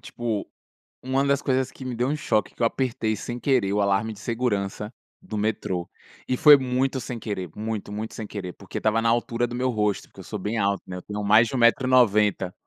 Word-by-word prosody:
tipo, 115 -4 -3 0.5
uma 130 +2 0
das 140 0 +2
coisas 130 -1 0
que 130 - -11
me 125 -1 -4
deu 125 +3 0
um 150 - 0
choque, 110 -7 -1
que - - -26
eu 115 - +4
apertei 115 -3 -1
sem 120 +3 -5
querer 120 -8 +1
o 105 - +1
alarme 100 +2 +1
de 100 - -12
segurança 105 -2 -2 0.3
do 110 - -5
metrô, 100 -5 -2 0.4
e 130 - +1
foi 150 +1 +9
muito 130 0 0
sem 120 -1 -6
querer, 95 -5 -4
muito, 110 -1 -4
muito 110 +2 -5
sem 110 - -5
querer, 95 -4 -6
porque 100 - -7
estava 110 +1 +2
na 115 - +1
altura 120 +1 +1
do 120 - -8
meu 130 +1 0
rosto, 105 -3 -1
porque - - -26
eu - - -16
sou 105 -3 -6
bem 110 +4 -2
alto 100 -1 +1
né, 90 - -7
eu 90 - -7
tenho 105 0 -5
mais 105 +3 +5
de 125 - -6
1 - - 0
metro 120 +2 +4
e - - 0
90. 105 -6 +3
110 Hz, 235 wpm, -25 LUFS, 105-125 Hz, 0.5 s, foi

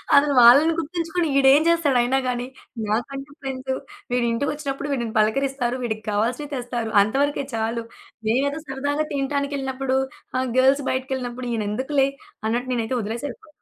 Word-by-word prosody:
అసలు 285 0 +5
వాళ్ళని 280 +8 +8
గుర్తించుకొని 335 +1 -1
ఇడేం 275 +2 +6
జేస్తాడయినా 270 -6 +3
గాని, 245 -1 -1 0.4
నాకంటే 275 +6 -3
ఫ్రెండ్సు, 265 -1 -3 0.4
వీడింటిికొచ్చినప్పుడు 275 +4 -1
వీడిని 235 -5 -2
పలకరిస్తారు. 250 +3 +1
వీడికి 220 -2 -3
కావాల్సిన 240 +8 0
తెస్తారు. 240 -3 -3
అంతవరకే 275 +7 +1
చాలు. 225 +1 -1 0.4
నేమేదో 280 +6 +1
సరదాగా 285 +3 -1
తినటానికెళ్ళినప్పుడు, 275 -1 -1 0.4
ఆహ్, 260 0 0
గర్ల్స్ 270 +2 +4
బయటికెళ్ళినప్పుడు, 255 -1 -3
ఈయనెందుకులే 260 +6 0 0.4
అన్నట్టు 240 +3 -1
నేనైతే 235 +1 -1
వదిలేసపో 235 +9 -5
265 Hz, 115 wpm, -23 LUFS, 240-280 Hz, 0.4 s, వాళ్ళని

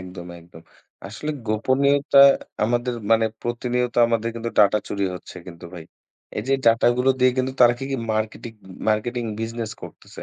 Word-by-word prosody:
একদম, 90 -1 -10
একদম 85 -1 -16 0.4
আসলে 110 +9 -6 0.2
গোপনীয়তা 140 +6 +2 0.5
আমাদের 120 +2 -1 0.2
মানে 115 0 +4 0.2
প্রতিনিয়ত 120 0 -2
আমাদের 115 -1 -1
কিন্তু 115 0 -4
ডাটা 105 0 +5
চুরি 100 -1 -2
হচ্ছে 90 - -11
কিন্তু 85 -1 -11
ভাই। 85 -2 -9 0.5
এই - - -2
যে, 135 - +3
ডাটা 115 0 +4
গুলো 125 +1 +2
দিয়ে 130 - +5
কিন্তু 130 +1 -1
তারা 120 -1 +6
কি, 135 - -5
কি 135 - -1 0.2
মার্কেটিক 110 +1 -4 0.3
মার্কেটিং 120 +3 -1 0.2
বিজনেস 115 0 -4
করতেছে? - - -11
115 Hz, 160 wpm, -22 LUFS, 105-125 Hz, 0.5 s, তারা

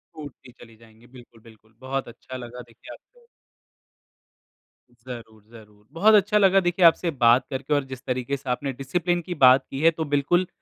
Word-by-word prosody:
टूटती 145 -4 -12
चली 115 -1 -18
जाएँगी, 115 +1 -21
बिल्कुल, 120 -3 -17
बिल्कुल। 110 -1 -21
बहुत 135 0 -4
अच्छा 125 +2 -11
लगा, 125 0 -10
देखिए 115 - -14
आपको 485 -1 -21 1.7
ज़रूर, 115 -3 -12
ज़रूर। 105 -2 -17
बहुत 210 +7 +3
अच्छा 210 +1 +2
लगा, 195 -1 +4
देखिए, 175 -1 +1
आपसे 165 +1 +3
बात 125 -2 +3
करके 140 +2 -3
और 145 -1 +1
जिस 130 - -9
तरीके 130 +2 -3
से 135 -1 -10
आपने 135 +2 -3
डिसिप्लिन 175 +5 -1
की - - -2
बात 130 +1 +5
की 135 - -6
है, 165 - +5
तो 160 0 -5
बिल्कुल, 175 +6 +1
130 Hz, 175 wpm, -23 LUFS, 120-165 Hz, 1.7 s, बात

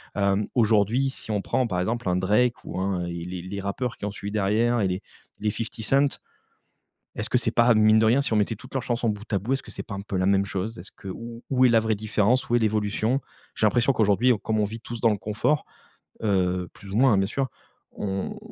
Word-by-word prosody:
hem, 100 +1 +1
aujourd'hui, 115 +3 +3
si 110 - -8
on 105 -1 0
prend, 130 - 0
par 90 -5 -1
exemple, 115 +4 -2
un 90 - +2
Drake 105 +6 +2
ou - - -5
un 95 -2 -1
et 85 -1 -5
les 90 0 -5
les 95 +3 -5
rappeurs 115 +5 -3
qui - - -5
ont 105 - -2
suivi 100 0 -6
derrière 110 +3 +2
et 95 - +2
les 90 +1 -2 0.4
les 105 0 0
50 115 +2 -4
Cent, 140 +6 +2 1.0
est-ce 110 0 -3
que - - +3
c'est 120 - -1
pas 120 0 +5
mine 110 0 +5
de 110 - +4
rien, 120 +5 +4
si 140 - -3
on 110 - +3
mettait 105 +2 +1
toutes 125 +5 -14
leurs 130 - 0
chansons 120 -1 0
bout 105 +1 -7
à - - +3
bout, 110 +8 -3
est-ce 135 - -3
que - - -12
c'est - - -6
pas 105 - -7
un 100 - -4
peu 100 -1 -4
la 95 - +1
même 100 0 +3
chose? 100 +4 -4
Est-ce 90 - -7
que 100 - -11
où 115 +5 -8
où 130 -1 +4
est - - +5
la 115 - +5
vraie 110 0 +1
différence? 110 +4 +1
Où 120 - +4
est - - +5
l'évolution? 110 +4 +1 0.3
J'ai 110 - +2
l'impression 120 +5 +3
qu'aujourd'hui, 110 +3 +3
on 115 - -1
comme 110 +2 -1
on - - +3
vit 110 +3 -5
tous 120 0 -7
dans 115 - +4
le 105 - 0
confort, 105 +9 0 0.6
heu 90 -3 +1
plus 100 - -12
ou 100 - -1
moins, 130 -1 +5
hein, - - +3
bien 95 - +2
sûr, 130 +4 -2 0.4
on 95 -1 -3
110 Hz, 255 wpm, -25 LUFS, 100-120 Hz, 1.0 s, pas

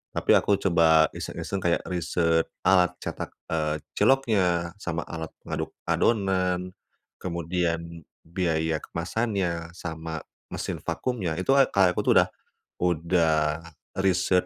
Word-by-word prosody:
Tapi - - +1
aku 100 - +3
coba 85 -5 +4
iseng-iseng 100 - -4
kayak 85 -1 +1
research 85 -1 +1 0.2
alat 90 -2 +5
cetak, - - -4 0.2
eee, 75 -2 0 0.2
ciloknya 95 -11 +2
sama 85 -1 -2
alat 80 -2 -6 0.2
ngaduk - - -3
adonan. 90 -4 +1 0.5
Kemudian 85 -1 -2 0.2
biaya 80 -2 0
kemasannya 85 -2 -2
sama 80 -2 -5 0.3
mesin - - -4
vakumnya, 100 -11 -2
itu 90 - +1
a 135 -1 +6
kayak 95 -2 +4
aku - - +1
tuh - - +4
udah - - +3 0.5
udah 85 -1 +2 0.7
research 90 -1 +2
85 Hz, 115 wpm, -26 LUFS, 80-95 Hz, 0.7 s, a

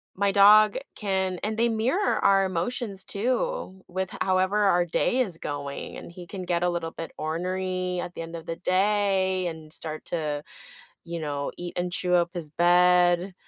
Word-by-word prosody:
my 200 +1 +1
dog 210 +2 +6 0.2
can 190 -3 -1
and 215 +1 -2
they 235 +1 +3
mirror 250 - +1
our 195 -1 +4
emotions, 195 +2 0
too 245 - -2
with 185 +1 -4
however 190 +2 +2
our 175 -2 +3
day 205 +8 0
is 190 -10 +2
going, 140 -1 -5
and - - -10
he 175 0 -11
can 190 0 -6
get 175 -1 -1
a 180 - +2
little 170 -2 -3
bit 165 - -7
ornery 185 +2 -2
at 175 - -5
the - - -6
end 165 0 -7
of 165 0 -8
the 165 - -4
day 190 -1 +1
and 160 -2 -6
start 155 -1 -4
to, 150 -3 -2 0.6
you 170 0 -5
know, 145 -2 -3
eat 175 0 -6
and 180 0 -2
chew 180 0 +1
up 170 0 +2
his 170 -4 -3
bed, 175 +2 +3
180 Hz, 180 wpm, -26 LUFS, 170-195 Hz, 0.6 s, dog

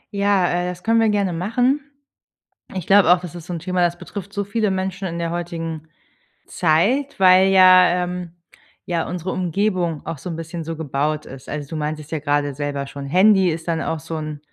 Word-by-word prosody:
Ja, 200 -2 +2
äh, 175 0 -1
das 180 0 -8
können 230 0 +3
wir 225 -1 +3
gerne 200 -4 0
machen. 245 - +1 0.9
Ich 185 -4 -5
glaube 195 -3 +5
auch, 180 - +5
das 175 -2 -9
ist 170 -1 -9
so 180 - -6
'n 170 - -3
Thema, 180 +2 -2
das 175 0 +1
betrifft 200 -1 -8
so 200 0 -2
viele 215 0 -1
Menschen 190 0 -3
in 170 0 -5
der 170 0 -2
heutigen 165 -2 -5 0.6
Zeit, 205 - +1
weil, 185 0 +6
ja 185 -1 +6
ähm, 180 -1 -5 0.5
ja 170 -2 -2
unsere 180 +1 -4
Umgebung 180 -3 -1
auch 160 -4 -5
so 180 - -7
'n 165 - -4
bisschen 165 0 -6
so 165 +1 -5
gebaut 150 0 -2
ist. 130 0 -11
Also, 145 -1 -5
du 160 - -6
meintest 150 0 -4
ja 160 - -2
gerade 145 -1 0
selber 140 0 -3
schon, 140 0 -8
Handy 190 +3 +4
ist 165 +1 -4
dann 165 -1 0
auch 160 - -2
so 160 +1 -6
'n 155 -1 -5
175 Hz, 205 wpm, -21 LUFS, 160-190 Hz, 0.9 s, weil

